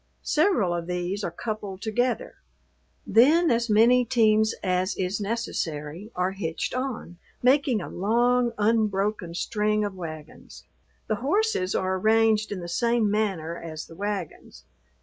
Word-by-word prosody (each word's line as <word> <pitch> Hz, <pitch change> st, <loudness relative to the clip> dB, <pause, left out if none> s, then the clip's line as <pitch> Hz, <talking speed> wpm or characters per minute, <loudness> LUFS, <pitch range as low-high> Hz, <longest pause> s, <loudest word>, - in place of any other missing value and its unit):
Several 300 Hz, -, +2 dB
of 170 Hz, -1 st, -4 dB
these 180 Hz, +3 st, -3 dB
are -, -, -1 dB
coupled 200 Hz, +1 st, -6 dB
together; 245 Hz, +3 st, -1 dB, 0.7 s
then 310 Hz, +8 st, +5 dB
as 235 Hz, 0 st, +1 dB
many 235 Hz, +4 st, +5 dB
teams 220 Hz, -2 st, +3 dB
as 185 Hz, +1 st, 0 dB
is 190 Hz, +2 st, -2 dB
necessary 180 Hz, -5 st, -4 dB
are 180 Hz, +1 st, 0 dB
hitched 175 Hz, -4 st, -4 dB
on 250 Hz, -9 st, -4 dB, 0.2 s
making 260 Hz, -3 st, +3 dB
a -, -, -6 dB
long, 240 Hz, +5 st, +1 dB
unbroken 210 Hz, -4 st, 0 dB
string 210 Hz, +2 st, 0 dB
of 205 Hz, -, -4 dB
wagons. 155 Hz, -4 st, -9 dB, 0.4 s
The 215 Hz, -, -1 dB
horses 295 Hz, -, 0 dB
are 190 Hz, 0 st, 0 dB
arranged 220 Hz, 0 st, +3 dB
in 195 Hz, -3 st, -4 dB
the 175 Hz, -, -6 dB
same 235 Hz, +3 st, +1 dB
manner 190 Hz, -6 st, -1 dB
as 160 Hz, -2 st, -7 dB
the -, -, -14 dB
wagons. 200 Hz, -3 st, -5 dB
210 Hz, 135 wpm, -25 LUFS, 180-235 Hz, 0.7 s, then